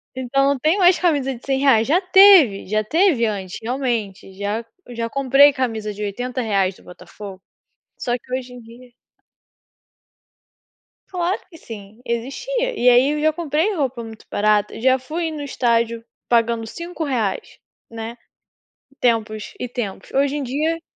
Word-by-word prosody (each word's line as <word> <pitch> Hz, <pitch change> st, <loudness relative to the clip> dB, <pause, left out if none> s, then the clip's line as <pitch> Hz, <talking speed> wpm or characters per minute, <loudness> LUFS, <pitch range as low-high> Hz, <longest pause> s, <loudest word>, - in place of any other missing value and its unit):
Então, 260 Hz, +2 st, +1 dB
não 280 Hz, -1 st, +1 dB
tem 310 Hz, +7 st, +2 dB
mais 365 Hz, -2 st, +5 dB
camisa 285 Hz, -7 st, 0 dB
de 235 Hz, -, -15 dB
R$100, 270 Hz, -4 st, +3 dB
já 320 Hz, +6 st, +3 dB
teve, 370 Hz, -, +6 dB
já 215 Hz, +2 st, 0 dB
teve 315 Hz, -, +2 dB
antes, 195 Hz, -4 st, -4 dB
realmente 230 Hz, -6 st, -3 dB
já 205 Hz, +4 st, -3 dB, 0.3 s
já 230 Hz, -1 st, -3 dB
comprei 275 Hz, +2 st, +5 dB
camisa 225 Hz, -6 st, -3 dB
de 205 Hz, -, -9 dB
R$80 210 Hz, -3 st, -1 dB
do -, -, -20 dB
Botafogo. 190 Hz, +1 st, -11 dB, 0.6 s
Só 240 Hz, -, -2 dB
que 250 Hz, +1 st, -15 dB
hoje 255 Hz, -1 st, -5 dB
em 250 Hz, -, -10 dB
dia 240 Hz, +2 st, -16 dB, 2.2 s
Claro 360 Hz, 0 st, -2 dB
que 330 Hz, -, -14 dB
sim, 215 Hz, -3 st, -11 dB
existia, -, -, -3 dB
e 250 Hz, -, +4 dB
aí 250 Hz, +3 st, +5 dB
eu 300 Hz, 0 st, -2 dB
já 310 Hz, +1 st, +3 dB
comprei 320 Hz, +5 st, -1 dB
roupa 265 Hz, -8 st, -2 dB
muito 220 Hz, -1 st, -11 dB
barata, 210 Hz, 0 st, +1 dB
já 260 Hz, +2 st, +3 dB
fui 320 Hz, +6 st, -4 dB
no 305 Hz, -2 st, -6 dB
estádio 235 Hz, -4 st, 0 dB, 0.2 s
pagando 230 Hz, -1 st, +1 dB
R$5, 275 Hz, -, -4 dB, 0.3 s
né, 230 Hz, +1 st, -7 dB, 0.8 s
tempos 215 Hz, -3 st, 0 dB
e 250 Hz, -, -3 dB
tempos 220 Hz, -6 st, -6 dB
hoje 280 Hz, +1 st, +1 dB
em 290 Hz, -, -3 dB
dia 305 Hz, +6 st, -1 dB
250 Hz, 145 wpm, -21 LUFS, 225-290 Hz, 2.2 s, teve